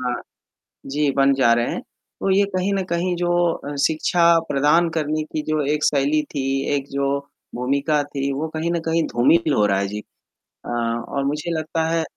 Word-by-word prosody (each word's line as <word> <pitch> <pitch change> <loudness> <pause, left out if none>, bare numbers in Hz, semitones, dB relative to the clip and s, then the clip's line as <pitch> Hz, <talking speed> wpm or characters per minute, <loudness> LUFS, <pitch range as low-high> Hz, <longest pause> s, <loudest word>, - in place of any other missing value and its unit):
हाँ, 125 -1 -1 0.7
जी 145 +1 0
बन 135 0 +4
जा 130 -3 +4
रहे 120 0 0
हैं, - - -3
तो 195 - -7
ये 200 +1 +4
कहीं 185 +2 0
न 195 - 0
कहीं 175 +1 0
जो 175 0 -1 0.2
अ, 145 -2 -6
शिक्षा 160 +2 0 0.3
प्रदान 150 +5 +3
करने 155 0 -1
की 155 - -2
जो 155 -1 +1
एक 150 - -1
शैली 145 +2 +2
थी, 135 -2 -1 0.3
एक 140 -1 -2
जो 140 0 0 0.4
भूमिका 140 +4 0
थी, 140 -1 -3
वो 150 +4 -3
कहीं 165 +2 -1
न 170 - 0
कहीं 165 0 +2
धूमिल 150 +6 +3
हो 105 - +3
रहा 100 -1 +1
है 100 - 0
जी। 105 +1 -5 0.7
अ, - - -7
और 120 +3 -2
मुझे 150 +4 -2
लगता 160 +1 -2
है 165 0 +1
145 Hz, 190 wpm, -22 LUFS, 135-165 Hz, 0.7 s, बन